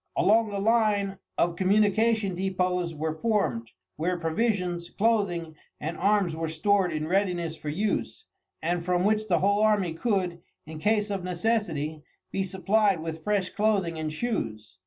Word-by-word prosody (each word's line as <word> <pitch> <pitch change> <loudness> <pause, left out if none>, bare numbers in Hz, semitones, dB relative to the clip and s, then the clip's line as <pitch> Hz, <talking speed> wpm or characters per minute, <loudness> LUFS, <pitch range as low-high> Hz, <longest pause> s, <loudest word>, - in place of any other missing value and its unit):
Along 220 +1 +4
the 200 - -4
line 205 -2 +2 0.2
of 170 0 +2
communication 210 +2 +2
depots 180 -2 -1
were 155 +1 -2
formed, 155 - 0 0.3
where 175 +4 0
provisions, 175 0 -1
clothing, 195 -7 0 0.2
and 160 +3 -4
arms 195 -3 +2
were 165 0 -3
stored 185 +3 +2
in 155 -1 -2
readiness 175 -3 0
for 150 - -6
use, 210 - -2 0.4
and 175 +1 0
from 180 0 +1
which 215 +1 +1
the 175 -5 +2
whole 205 +2 +3
army 205 -6 +2
could, 180 -2 -1 0.2
in 160 0 -8
case 210 +3 +1
of 195 -2 -2
necessity, 175 -5 -1 0.3
be 195 - -1
supplied 195 0 +1
with 160 -1 -5
fresh 205 -3 0
clothing 200 -6 0
and 155 -1 -2
shoes. 115 - -4
185 Hz, 150 wpm, -27 LUFS, 165-210 Hz, 0.4 s, Along